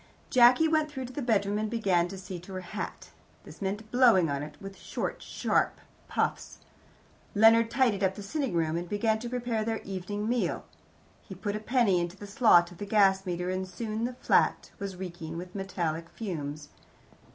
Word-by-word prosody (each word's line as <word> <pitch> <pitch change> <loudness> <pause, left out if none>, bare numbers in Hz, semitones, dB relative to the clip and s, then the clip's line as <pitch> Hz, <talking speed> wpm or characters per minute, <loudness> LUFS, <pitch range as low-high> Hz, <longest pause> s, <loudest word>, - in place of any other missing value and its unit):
Jacky 250 +5 +6
went 310 -1 +2
through 265 -3 -5
to 250 - -9
the 290 - -4
bedroom, 210 -4 +1
and 215 0 -1
began 195 -7 +2
to 195 +2 -8
see 185 -1 -7
to 185 +3 -11
her 185 - -4
hat. 200 +4 -6 0.3
This - - -13
meant 205 +3 -3
blowing 235 - +5
at 140 0 -2
it 150 0 -8
with 195 0 -9
short - - -4
sharp - - 0 0.3
puffs. - - -2 0.8
Leonard 225 +2 +6
tidied 230 -5 +2
up 190 0 +2
the 205 - -7
sitting 270 - -2
room, 160 -1 +1
and 175 0 -5
began 220 +1 +1
to 240 +1 -5
prepare 240 -3 -1
their 225 0 -1
evening 200 +2 -4
meal. 245 +1 -1 0.6
He 190 - -10
put 205 +3 -3
a - - -2
penny 215 -5 +2
into 175 +2 -4
the 205 - -9
slot 200 -5 +4
of 175 - -14
the 205 - -4
gas 195 -2 +3
meter, 180 +1 -2
and 185 0 -2
soon 215 +4 -3
the 250 0 -4
flat - - +2
was 200 -2 -5
reeking 175 -3 -6
with 180 +1 -7
metallic 170 -4 -3
fumes. 150 -8 -5
200 Hz, 190 wpm, -29 LUFS, 180-230 Hz, 0.8 s, Jacky